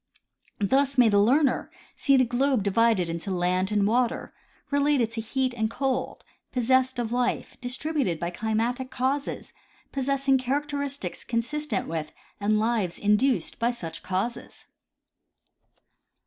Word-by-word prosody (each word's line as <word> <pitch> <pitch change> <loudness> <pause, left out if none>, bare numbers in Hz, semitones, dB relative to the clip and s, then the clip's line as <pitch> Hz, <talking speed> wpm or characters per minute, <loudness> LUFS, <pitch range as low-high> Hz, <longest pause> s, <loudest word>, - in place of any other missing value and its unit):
Thus 270 +6 +1
may 245 -3 +6
the 205 -1 +4
learner 265 +5 +3 0.3
see 275 -1 +4
the 255 - +4
globe 250 -1 +1
divided 205 -2 +3
into 170 +3 -4
land 185 +1 0
and 205 -1 +2
water, 240 +3 0 0.4
related 285 -5 +2
to 230 0 -3
heat 255 +3 -1
and 220 -2 -1
cold, 265 +2 -2 0.3
possessed 260 +1 +2
of 235 -1 -2
life, 245 0 -1
dis 245 +1 -3
tributed 280 - -1
by 170 0 -2
climatic 225 +6 -1
causes, 270 +3 -2 0.4
possessing 275 0 +1
characteristics 280 - -3
consistent 240 0 -2
with 160 -2 -4 0.3
and 210 +1 +2
lives 215 -5 0
induced 215 +6 +1
by 235 0 +2
such 170 -10 -6
causes. 195 +6 -4
240 Hz, 130 wpm, -26 LUFS, 210-270 Hz, 0.4 s, may